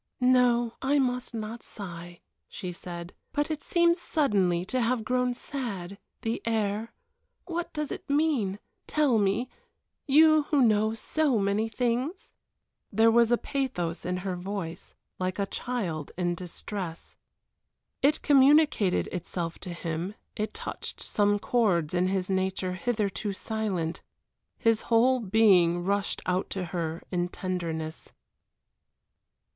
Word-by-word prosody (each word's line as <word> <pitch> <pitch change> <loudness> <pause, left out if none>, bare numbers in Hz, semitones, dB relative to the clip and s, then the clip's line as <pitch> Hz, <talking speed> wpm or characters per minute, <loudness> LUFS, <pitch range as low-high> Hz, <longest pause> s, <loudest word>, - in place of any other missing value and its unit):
"No, 245 -2 +4
I 275 +2 +2
must 250 -3 0
not 220 +1 -5
sigh," 175 -3 -9 0.3
she 180 - -5
said. 175 0 -8 0.2
"But 290 +2 0
it 305 -1 -3
seems 340 0 +2
suddenly 190 - +1
to 255 +6 -1
have 235 0 +1
grown 250 +1 +1
sad 200 -9 -5 0.2
the 225 +1 -1
air 220 -1 -1 0.5
what 345 -1 -3
does 300 -1 -3
it - - -7
mean? 280 -10 +1 0.3
Tell 285 -7 +3
me, 205 +5 +1 0.6
you 310 +1 +6
who 290 -4 +4
know 220 -1 +3
so 285 +2 +1
many 205 +2 +1
things?" 250 - -2 0.6
There 225 +2 +5
was 235 0 +4
a 240 - +5
pathos 230 -14 -2
in 180 +1 -1
her 185 -2 -1
voice 180 -1 -6 0.2
like 185 0 -1
a 200 - +1
child 190 - -3
in 175 -1 +1
distress. 175 0 -6 0.9
It 295 +3 +3
communicated 285 - +5
itself 170 -1 -4
to - - -7
him, 170 +3 -4 0.2
it 215 0 -3
touched - - -6
some 205 0 +2
chords 195 -9 +1
in 180 +1 +2
his 185 -1 0
nature 190 -1 -1
hitherto 205 -1 -1
silent. 190 -6 -2 0.6
His 225 -1 +2
whole 245 +3 +4
being 185 -5 +4
rushed 200 +1 -1
out 185 +1 0
to 190 -2 -3
her 165 -2 -2
in 175 -1 0
tenderness. 165 -4 -4
210 Hz, 130 wpm, -28 LUFS, 180-250 Hz, 0.9 s, you